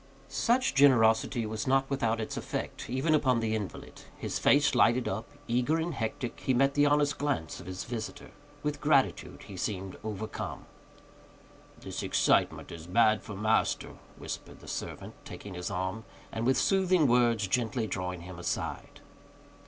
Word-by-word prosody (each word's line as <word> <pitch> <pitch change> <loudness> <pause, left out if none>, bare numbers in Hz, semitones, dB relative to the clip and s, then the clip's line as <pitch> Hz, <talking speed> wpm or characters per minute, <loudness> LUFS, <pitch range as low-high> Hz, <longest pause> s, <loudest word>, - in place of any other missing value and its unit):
Such 255 +2 +2
generosity 115 -4 +4
was 110 +5 -4
not 135 +1 +3
without 115 -5 0
its 110 - -4
effect, - - -5
even 135 +6 +1
upon 130 -5 +3
the 110 -1 -1
invalid. 105 -3 -6 0.2
His - - -3
face 145 +1 +4
lighted 120 +2 +4
up; 105 +4 -3 0.2
eager 125 +7 +2
and 165 +1 -2
hectic, 120 0 -3
he 130 - +1
met 135 +2 +3
the 145 0 +4
honest 145 0 +2
glance 140 - -2
of 90 - -11
his 95 0 -5
visitor. 115 -3 -6 0.3
With 150 0 -2
gratitude 140 -3 +1
he - - -10
seemed 95 -2 -3
overcome. 110 0 -5 1.1
"This - - -5
excitement - - +2
is 85 0 -9
bad 110 +3 +4
for 105 - -8
master," 110 +3 +1 0.2
whispered - - -7
the - - -14
servant, - - -5
taking 100 - -9
his 90 0 -4
arm, 95 +5 -3 0.3
and 110 +2 -2
with 130 - +4
soothing 185 -4 +3
words 120 -4 +3
gently 115 +2 0
drawing 90 -3 -4
him 90 0 -9
aside. 85 - -4
115 Hz, 155 wpm, -30 LUFS, 105-140 Hz, 1.1 s, generosity